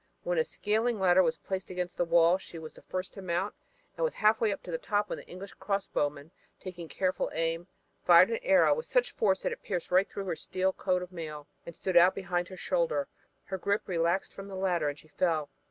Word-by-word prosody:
When -, -, 0 dB
a -, -, +4 dB
scaling 220 Hz, -, -1 dB
ladder 185 Hz, -1 st, +5 dB
was 165 Hz, -2 st, +1 dB
placed 190 Hz, +1 st, -5 dB
against 180 Hz, -1 st, -4 dB
the 175 Hz, -, 0 dB
wall 170 Hz, +2 st, +4 dB
she 170 Hz, -, -10 dB
was 160 Hz, -1 st, -8 dB
the -, -, -15 dB
first 185 Hz, 0 st, -5 dB
to 195 Hz, -, -9 dB
mount 185 Hz, +2 st, -1 dB, 0.4 s
and -, -, -2 dB
was 485 Hz, -, 0 dB
half 215 Hz, +1 st, +3 dB
way 220 Hz, -2 st, +3 dB
to 190 Hz, -2 st, -6 dB
the 165 Hz, -, -2 dB
top 205 Hz, 0 st, 0 dB
when -, -, -3 dB
an -, -, -12 dB
English 195 Hz, +2 st, -9 dB
crossbowman, 155 Hz, -7 st, -2 dB, 0.3 s
taking 175 Hz, -3 st, -8 dB
careful 185 Hz, +2 st, -1 dB
aim, 165 Hz, +2 st, -1 dB, 0.4 s
fired -, -, +7 dB
an 460 Hz, -, 0 dB
arrow -, -, +5 dB
with 475 Hz, -, -4 dB
such -, -, +2 dB
force 195 Hz, -3 st, +1 dB
that -, -, -1 dB
it -, -, -6 dB
pierced 180 Hz, -4 st, -4 dB
right 185 Hz, +2 st, +4 dB
through 200 Hz, -, -5 dB
her 185 Hz, -, -2 dB
steel 185 Hz, +3 st, -1 dB
coat 180 Hz, -1 st, 0 dB
of 180 Hz, 0 st, -11 dB
mail 155 Hz, -4 st, -6 dB, 0.2 s
and 170 Hz, -, -8 dB
stood 185 Hz, -2 st, -3 dB
out 175 Hz, +2 st, +7 dB
behind 175 Hz, -2 st, -2 dB
her 185 Hz, -, -10 dB
shoulder. 165 Hz, -7 st, 0 dB, 0.3 s
Her 190 Hz, -1 st, -5 dB
grip 200 Hz, +3 st, 0 dB
relaxed 170 Hz, +1 st, 0 dB
from 195 Hz, 0 st, -9 dB
the 195 Hz, -, -7 dB
ladder 180 Hz, -5 st, +1 dB
and 145 Hz, -, -6 dB
she 155 Hz, -, -17 dB
fell. 155 Hz, -4 st, 0 dB
185 Hz, 230 wpm, -30 LUFS, 170-195 Hz, 0.4 s, fired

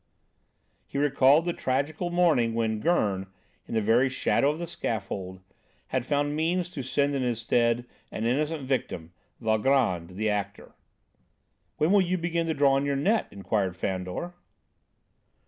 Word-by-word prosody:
He -, -, -6 dB
recalled 140 Hz, +2 st, +4 dB
the 175 Hz, -, 0 dB
tragical 145 Hz, +7 st, -1 dB
morning 155 Hz, -10 st, +2 dB
when 110 Hz, -2 st, 0 dB
Gurn, 105 Hz, -, +1 dB, 0.4 s
in -, -, -4 dB
the 110 Hz, -, +2 dB
very 120 Hz, +5 st, +3 dB
shadow 135 Hz, +1 st, +1 dB
of 150 Hz, -, -2 dB
the 170 Hz, -, -4 dB
scaffold, 95 Hz, -, -4 dB, 0.5 s
had 130 Hz, -1 st, -2 dB
found 145 Hz, 0 st, 0 dB
means 175 Hz, +3 st, 0 dB
to 150 Hz, -, -5 dB
send 140 Hz, +2 st, 0 dB
in 135 Hz, -, -1 dB
his 120 Hz, -3 st, -1 dB
stead 120 Hz, +1 st, +1 dB, 0.3 s
an 110 Hz, -, -3 dB
innocent 150 Hz, +5 st, 0 dB
victim, 110 Hz, -11 st, -3 dB, 0.3 s
Valgrand, 110 Hz, -6 st, +1 dB
the 110 Hz, +3 st, -1 dB
actor. 100 Hz, -1 st, -3 dB, 1.0 s
"When 155 Hz, +3 st, +2 dB
will 205 Hz, -1 st, +6 dB
you 185 Hz, 0 st, 0 dB
begin 170 Hz, -1 st, -1 dB
to 160 Hz, -, -1 dB
draw 140 Hz, -1 st, +4 dB
in 140 Hz, -, 0 dB
your 140 Hz, -, 0 dB
net?" 200 Hz, +11 st, +1 dB
inquired 95 Hz, -1 st, -2 dB
Fandor. 95 Hz, -, -3 dB
130 Hz, 150 wpm, -27 LUFS, 110-155 Hz, 1.0 s, will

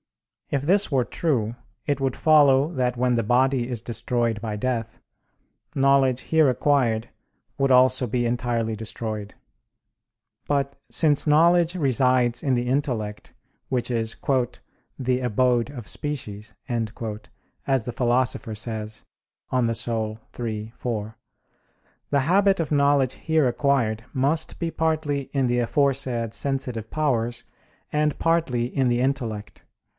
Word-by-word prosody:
If 140 Hz, -2 st, -1 dB
this 195 Hz, +4 st, +2 dB
were 130 Hz, -3 st, +3 dB
true, 120 Hz, -9 st, -1 dB, 0.3 s
it 145 Hz, -2 st, -1 dB
would 135 Hz, -1 st, 0 dB
follow 145 Hz, 0 st, +4 dB
that 125 Hz, -3 st, 0 dB
when 125 Hz, 0 st, +2 dB
the 115 Hz, -, +1 dB
body 125 Hz, +2 st, +2 dB
is 120 Hz, -3 st, -4 dB
destroyed 120 Hz, -2 st, -1 dB
by 110 Hz, -2 st, -3 dB
death, 115 Hz, -1 st, -3 dB, 0.8 s
knowledge 135 Hz, -2 st, +3 dB
here 160 Hz, -3 st, +3 dB
acquired 120 Hz, -4 st, +1 dB, 0.5 s
would 135 Hz, -1 st, +2 dB
also 130 Hz, 0 st, +5 dB
be 120 Hz, +2 st, 0 dB
entirely 120 Hz, -2 st, -1 dB
destroyed. 110 Hz, -1 st, -5 dB, 1.1 s
But, 140 Hz, -1 st, 0 dB
since 150 Hz, -2 st, +2 dB
knowledge 170 Hz, +3 st, +4 dB
resides 130 Hz, -5 st, +2 dB
in 135 Hz, -3 st, +2 dB
the 120 Hz, 0 st, -1 dB
intellect, 125 Hz, -6 st, -2 dB, 0.4 s
which 125 Hz, -2 st, -1 dB
is 115 Hz, -1 st, -1 dB, 0.8 s
"the 130 Hz, -1 st, 0 dB
abode 125 Hz, +1 st, +1 dB
of 125 Hz, -8 st, -9 dB
species," 110 Hz, -, -5 dB
as 115 Hz, +2 st, -4 dB
the 120 Hz, -, -4 dB
Philosopher 125 Hz, -1 st, 0 dB
says 110 Hz, -1 st, -4 dB, 0.5 s
(De -, -, -1 dB
Anima 115 Hz, -2 st, 0 dB, 0.3 s
iii, 110 Hz, -1 st, -4 dB
4), 110 Hz, -2 st, -4 dB, 0.9 s
the 140 Hz, -, +2 dB
habit 195 Hz, +6 st, +3 dB
of 160 Hz, -2 st, -2 dB
knowledge 140 Hz, -3 st, +3 dB
here 160 Hz, -4 st, +1 dB
acquired 120 Hz, -4 st, +1 dB
must 145 Hz, +4 st, 0 dB
be 170 Hz, -1 st, -2 dB
partly 155 Hz, -4 st, -1 dB
in 135 Hz, -2 st, +1 dB
the 120 Hz, 0 st, +1 dB
aforesaid 120 Hz, -2 st, 0 dB
sensitive 125 Hz, -5 st, -3 dB
powers 120 Hz, -6 st, -1 dB, 0.5 s
and 150 Hz, -1 st, +1 dB
partly 165 Hz, -8 st, +1 dB
in 130 Hz, +1 st, 0 dB
the 120 Hz, 0 st, +1 dB
intellect. 120 Hz, -6 st, -3 dB
125 Hz, 125 wpm, -24 LUFS, 115-140 Hz, 1.1 s, also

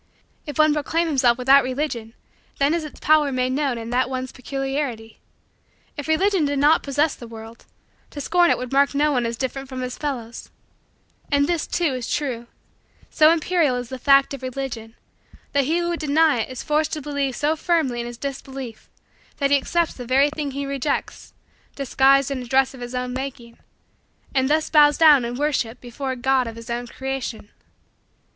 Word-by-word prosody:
If 295 Hz, -, -6 dB
one 310 Hz, -1 st, +5 dB
proclaim 320 Hz, +3 st, 0 dB
himself 255 Hz, -6 st, +2 dB
without 265 Hz, +2 st, +5 dB
Religion 255 Hz, -4 st, -3 dB, 0.4 s
then 280 Hz, +2 st, +2 dB
is 335 Hz, -1 st, -1 dB
its 305 Hz, -, -10 dB
power 305 Hz, -2 st, +3 dB
made 255 Hz, 0 st, 0 dB
known 270 Hz, -2 st, 0 dB
in 230 Hz, 0 st, -6 dB
that 255 Hz, +1 st, +1 dB
one's 255 Hz, -1 st, -4 dB
peculiarity. 270 Hz, -4 st, -4 dB, 0.8 s
If 290 Hz, -1 st, -6 dB
Religion 370 Hz, +3 st, +2 dB
did 285 Hz, -1 st, 0 dB
not 295 Hz, +3 st, +4 dB
possess 290 Hz, +2 st, 0 dB
the 235 Hz, -, -11 dB
world, 225 Hz, 0 st, -11 dB, 0.4 s
to 290 Hz, -, -8 dB
scorn 345 Hz, +4 st, +3 dB
it -, -, +3 dB
would 250 Hz, -1 st, -6 dB
mark 280 Hz, +1 st, +3 dB
no 300 Hz, +1 st, +3 dB
one 245 Hz, -4 st, 0 dB
as 230 Hz, 0 st, -4 dB
different 270 Hz, +1 st, -4 dB
from 260 Hz, -1 st, -5 dB
his 250 Hz, 0 st, -5 dB
fellows, 245 Hz, -6 st, -5 dB, 0.8 s
And 285 Hz, 0 st, +3 dB
this, 335 Hz, 0 st, -1 dB
too, 335 Hz, -6 st, 0 dB
is 250 Hz, -2 st, -4 dB
true: 250 Hz, -5 st, -2 dB, 0.6 s
so 310 Hz, -1 st, +6 dB
imperial 330 Hz, -4 st, +2 dB
is 245 Hz, -1 st, -5 dB
the 260 Hz, -, -6 dB
fact 275 Hz, +1 st, +4 dB
of 275 Hz, -, -7 dB
Religion, 250 Hz, -3 st, -5 dB, 0.6 s
that 280 Hz, -1 st, +2 dB
he 320 Hz, +5 st, +1 dB
who 345 Hz, 0 st, -1 dB
would 340 Hz, -, -2 dB
deny 305 Hz, -2 st, +3 dB
it 225 Hz, -, -2 dB
is 255 Hz, -1 st, -6 dB
forced 305 Hz, 0 st, 0 dB
to 305 Hz, -, -3 dB
believe 285 Hz, -3 st, -2 dB
so 305 Hz, +2 st, +1 dB
firmly 315 Hz, -7 st, 0 dB
in 235 Hz, -, -4 dB
his 240 Hz, -1 st, -8 dB
disbelief 265 Hz, -3 st, -7 dB, 0.5 s
that 280 Hz, -1 st, 0 dB
he 285 Hz, -, +6 dB
accepts 340 Hz, +4 st, 0 dB
the 250 Hz, -, -8 dB
very 270 Hz, +4 st, +3 dB
thing 300 Hz, -1 st, -3 dB
he 280 Hz, +1 st, -4 dB
rejects, 275 Hz, +1 st, -3 dB, 0.4 s
disguised 275 Hz, 0 st, +3 dB
in 265 Hz, -2 st, -3 dB
a -, -, -7 dB
dress 265 Hz, +2 st, +2 dB
of 260 Hz, -, -12 dB
his 245 Hz, +1 st, -6 dB
own 250 Hz, 0 st, -3 dB
making, 255 Hz, -3 st, -7 dB, 0.7 s
and 265 Hz, -1 st, +1 dB
thus 310 Hz, +1 st, +2 dB
bows 295 Hz, -1 st, +6 dB
down 300 Hz, -5 st, +6 dB
in 240 Hz, +1 st, -4 dB
worship 255 Hz, -4 st, -1 dB
before 250 Hz, +3 st, -6 dB
a 260 Hz, -, -1 dB
God 255 Hz, 0 st, +1 dB
of 225 Hz, -, -7 dB
his 230 Hz, 0 st, -8 dB
own 240 Hz, +1 st, -3 dB
creation. 265 Hz, -4 st, -5 dB
270 Hz, 195 wpm, -22 LUFS, 250-295 Hz, 0.8 s, so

